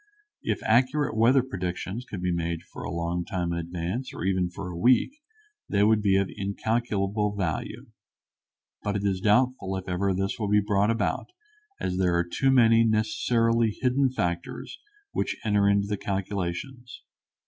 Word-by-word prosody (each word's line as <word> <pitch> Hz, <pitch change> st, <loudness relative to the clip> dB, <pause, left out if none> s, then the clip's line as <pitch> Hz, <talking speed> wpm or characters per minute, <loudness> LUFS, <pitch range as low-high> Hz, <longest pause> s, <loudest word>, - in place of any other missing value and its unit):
If -, -, -2 dB
accurate 130 Hz, +5 st, +2 dB
weather 120 Hz, +4 st, +4 dB
predictions 95 Hz, +1 st, -4 dB
could 95 Hz, -6 st, -7 dB
be 90 Hz, -, +1 dB
made 85 Hz, -1 st, -2 dB
for -, -, -11 dB
a -, -, -5 dB
long 85 Hz, +1 st, -2 dB
time 85 Hz, -1 st, -2 dB
in 85 Hz, -, -2 dB
advance, 90 Hz, +9 st, -4 dB
or -, -, -11 dB
for -, -, -2 dB
even 95 Hz, -2 st, +1 dB
a 90 Hz, -3 st, -5 dB
week, 120 Hz, -, +3 dB, 0.6 s
they 100 Hz, 0 st, +3 dB
would 110 Hz, 0 st, +4 dB
be 100 Hz, -2 st, +3 dB
of 100 Hz, -1 st, +1 dB
incalculable 105 Hz, 0 st, -1 dB
value. 85 Hz, -9 st, -3 dB, 1.0 s
But 105 Hz, 0 st, -2 dB
it 100 Hz, -, -1 dB
is 95 Hz, -2 st, 0 dB
doubtful 105 Hz, -2 st, +2 dB
if 95 Hz, -, -7 dB
ever 95 Hz, +2 st, 0 dB
this 95 Hz, +3 st, -2 dB
will 105 Hz, -2 st, -1 dB
be 105 Hz, 0 st, +5 dB
brought 105 Hz, 0 st, +1 dB
about, 115 Hz, 0 st, -1 dB, 0.5 s
as 90 Hz, -, -2 dB
there 90 Hz, -2 st, +2 dB
are 85 Hz, 0 st, +1 dB
too 135 Hz, +10 st, +1 dB
many 115 Hz, -3 st, +5 dB
necessarily 115 Hz, +1 st, +1 dB
hidden 130 Hz, +1 st, +2 dB
factors 85 Hz, -8 st, -4 dB, 0.3 s
which -, -, -2 dB
enter 105 Hz, -1 st, +3 dB
into 100 Hz, 0 st, +3 dB
the 105 Hz, 0 st, -2 dB
calculations. 100 Hz, +6 st, -4 dB
100 Hz, 165 wpm, -26 LUFS, 90-115 Hz, 1.0 s, be